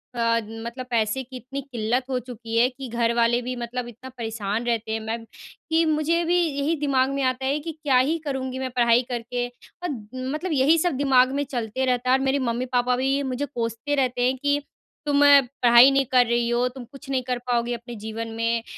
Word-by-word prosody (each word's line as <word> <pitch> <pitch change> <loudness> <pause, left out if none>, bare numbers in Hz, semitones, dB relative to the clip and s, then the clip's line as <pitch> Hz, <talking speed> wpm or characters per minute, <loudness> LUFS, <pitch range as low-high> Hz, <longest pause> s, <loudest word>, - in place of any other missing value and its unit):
अ, 230 -1 +2
मतलब 235 +3 -7
पैसे 230 +1 0
की 260 +1 -13
इतनी 270 +3 -6
किल्लत 245 -2 -1
हो 260 - 0
चुकी 230 -2 -5
है 240 +2 +5
कि 260 +1 -8
घर 235 0 +1
वाले 235 +1 +3
भी 250 +1 -4
मतलब 240 0 -4
इतना 240 +2 -10
परेशान 225 -1 -3
रहते 230 -2 -1
हैं। 220 - -1
मैं 225 +1 -2
कि 320 +7 -3
मुझे 315 +2 +1
भी 350 +2 +2
यही 300 -1 0
दिमाग 270 -3 +2
में 275 - -1
आता 255 0 0
है 275 +2 +1
कि 325 +2 -5
क्या 295 -4 +1
ही 280 +6 +2
करूँगी 260 -2 -3
मैं 260 0 -2
पढ़ाई 235 -1 +4
करके? 245 0 -3 0.4
अद 260 -12 -4 0.3
मतलब 345 +4 -3
यही 290 +4 +4
सब 350 +2 +1
दिमाग 260 -2 +4
में - - +1
चलते 255 -2 -3
रहता 250 -1 0
है 260 - +6
और - - -4
मेरी 270 +1 +2
मम्मी-पापा 245 +1 0
भी 270 +2 0
मुझे 275 +3 -2
कोसते 235 +1 -3
रहते 255 -3 0
हैं, 260 +1 0
"कि 285 +2 0 0.4
तुम 290 -1 +2 0.4
पढ़ाई 240 +2 +8
नहीं 275 0 +2
कर 250 -1 +5
रही 235 0 0
हो, 240 +1 +2
तुम 255 0 -9
कुछ 275 0 -13
नहीं 260 -2 0
कर 250 0 -2
पाओगी 240 0 0
अपने 240 0 -7
जीवन 220 +1 -4
में, 230 0 0
250 Hz, 210 wpm, -24 LUFS, 235-275 Hz, 0.4 s, पढ़ाई